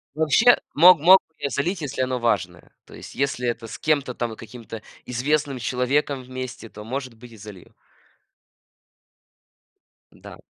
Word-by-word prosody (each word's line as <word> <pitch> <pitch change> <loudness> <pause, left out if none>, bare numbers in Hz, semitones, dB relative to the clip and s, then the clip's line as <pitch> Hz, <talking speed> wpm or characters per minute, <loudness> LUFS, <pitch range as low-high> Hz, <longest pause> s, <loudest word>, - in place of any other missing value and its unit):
Вообще 160 +11 +4 0.2
мог 175 +2 +7
мог 185 +5 +7
бы 160 - -44
я 140 -1 -3
залить, 165 - -2
если 130 -2 -3
оно 130 0 -1
важное. 90 -7 -2
То - - -17
есть, - - -11
если 130 -3 -1
это 115 -1 -4
с - - -8
кем-то 145 -5 0
там 120 -2 -3
и - - -10
каким-то 115 0 -10 0.2
известным 140 +2 -1
человеком 130 +3 -1
вместе, 130 -2 -8
то, 105 - -11
может 130 +1 -5
быть, 120 +2 -15
и - - -13
залью. 105 -3 -13 2.4
Н-да. - - -14
130 Hz, 155 wpm, -23 LUFS, 115-145 Hz, 2.4 s, мог